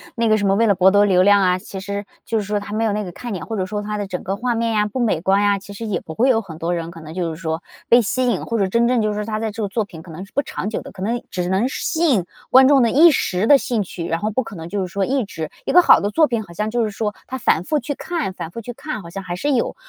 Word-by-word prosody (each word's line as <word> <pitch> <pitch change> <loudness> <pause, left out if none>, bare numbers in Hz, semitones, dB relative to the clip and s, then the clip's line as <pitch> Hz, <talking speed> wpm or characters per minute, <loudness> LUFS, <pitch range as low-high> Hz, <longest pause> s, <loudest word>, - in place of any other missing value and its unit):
那 230 -1 +1
个 215 - +4
什 205 - -1
么 195 - +3
为 225 +3 +3
了 200 - +4
博 190 +1 +5
得 205 +1 +5
流 185 -3 +4
量 205 0 +5
啊， 180 -1 +3
其 190 +1 -8
实 200 +1 -5 0.2
就 225 - -1
是 210 - 0
说 210 +1 -1
它 205 0 -8
没 220 - 0
有 215 -2 +1
那 210 - -1
个 180 - -7
看 235 +5 -7
点， 185 - -5
或 225 - -3
者 185 - -1
说 210 +2 -4
它 210 0 -4
的 205 - -3
整 185 -2 -5
个 195 - -2
画 240 +3 -1
面 230 0 0
呀 210 -1 +2
不 210 +5 -4
美 225 -9 +1
观 190 +4 +2
呀， 205 -1 +3
其 200 +1 -11
实 225 +2 -6
也 185 -5 -1
不 160 - -9
会 245 +10 +2
有 225 -3 +3
很 160 -4 -10
多 170 +1 -1
人 165 0 -4
可 165 -1 -11
能 155 0 -10
就 170 -3 -2
是 160 - -11
说 160 +1 -3 0.3
被 240 - +7
吸 250 +3 0
引， 240 - 0
或 230 -1 -1
者 195 - +2
真 235 +4 +2
正 250 -2 +2
就 215 - +1
是 210 - -2
说 210 0 -3
他 215 0 -3
在 220 0 -2
这 220 +1 -4
个 205 - 0
作 220 +3 -1
品 165 -5 -11
可 170 - -12
能 175 +4 -7
是 - - -24
不 280 - +2
长 205 - -4
久 220 - -3
的， - - -10
可 190 - -11
能 230 +5 -2
只 180 -1 -2
能 195 +7 +2
是 - - -5
吸 335 +1 0
引 225 - +3 0.3
观 260 +1 +8
众 275 -3 +5
的 230 - +2
一 325 +5 +7
时 195 - 0
的 285 - +8
兴 240 -5 -1
趣， 175 -3 -6
然 165 0 -1
后 210 +3 -1
不 260 +4 -1
可 225 - -10
能 165 0 -8
就 205 +1 -2
是 185 - -2
说 200 - 0
一 265 -3 0
直 160 -5 -6 0.2
一 - - 0
个 360 - +8
好 - - +7
的 205 +1 -2
作 315 +4 +4
品 230 -4 -2
好 170 - -13
像 210 +4 -2
就 235 +1 0
是 215 - -2
说， 210 0 -3
它 260 - -6
反 175 - +2
复 300 +10 0
去 280 +4 -4
看 330 - -3
反 170 -2 -7
复 230 - -7
去 245 +2 -7
看， 280 -1 -6
好 170 - -10
像 195 +2 -6
还 175 0 -4
是 290 +10 -1
有， 250 - 0
205 Hz, 375 characters per minute, -20 LUFS, 185-235 Hz, 0.3 s, 观